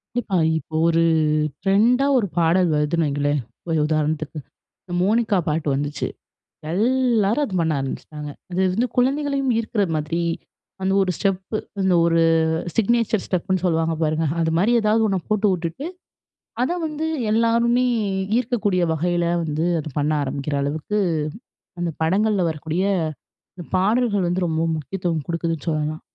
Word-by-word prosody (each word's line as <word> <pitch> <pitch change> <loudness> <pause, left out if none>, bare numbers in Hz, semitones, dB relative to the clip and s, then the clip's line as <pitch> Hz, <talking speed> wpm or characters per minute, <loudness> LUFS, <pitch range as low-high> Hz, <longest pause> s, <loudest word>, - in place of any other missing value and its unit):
கண்டிப்பா. 215 -6 0 0.2
இப்ப 160 - -9 0.2
ஒரு 165 0 +3 0.6
ட்ரெண்டா 230 +8 +3
ஒரு 220 -5 +1
பாடல் 170 +2 +3
வருதுன்னு 150 +2 +1
வைங்களேன் 145 0 0 0.3
ஒரு 160 - +1
உதாரணத்துக்கு. 155 0 -1 0.5
இந்த 175 - -8
மோனிக்கா 215 +1 +2
பாட்டு 155 0 -1
வந்துச்சு. 145 +1 -2 0.6
எல்லாரும் 235 - +2
அத 195 - -6
பண்ண 160 -1 +1
ஆரம்பிச்சுட்டாங்க. 150 +2 -6 0.2
அது 180 +1 -1
வந்து 235 +4 +1
குழந்தைகளையும் 275 +1 +1
ஈர்க்கிற 225 -2 -1
மாதிரி 155 +3 -2 0.6
அந்த 190 0 +1
ஒரு 190 - 0
ஸ்டெப்பு. 195 +1 -1 0.2
அந்த 190 -1 +2
ஒரு 165 0 +3 0.6
சிக்னேச்சர் 225 -1 +2
ஸ்டெப் 180 -3 -1
புன்னு 185 -1 0
சொல்லுவாங்க 165 -1 +1
பாருங்க. 155 +1 +1 0.2
அது 160 0 0
மாரி 205 +7 +3
எதாவது 215 +1 +3
ஒண்ண 195 -2 +1
போட்டு 215 -1 +2
வுட்டுட்டு, 175 - -3 0.8
அத 260 - 0
வந்து 310 0 -3 0.3
எல்லாருமே 235 +2 +3 0.5
ஈர்க்கக்கூடிய 210 -7 0
வகையில 175 +2 0 0.2
வந்து 155 +1 -1
அத 155 - -6
பண்ண 145 +1 +1
ஆரம்பிக்கிற 140 +1 -3
அளவுக்கு, 155 +9 -2 0.8
அந்த 175 - 0
படங்கள்ல 195 +3 +2
வரக்கூடிய 160 +4 -2 0.7
இந்த 175 - -9
பாடல்கள் 205 0 +2
வந்து 180 +1 0
ரொம்ப 160 -1 -1
முக்கியத்துவம் 165 0 -3
குடுக்குதுன்னு 165 -3 -3
சொல்லலாம். 155 0 -2
180 Hz, 135 wpm, -22 LUFS, 160-220 Hz, 0.8 s, ஒரு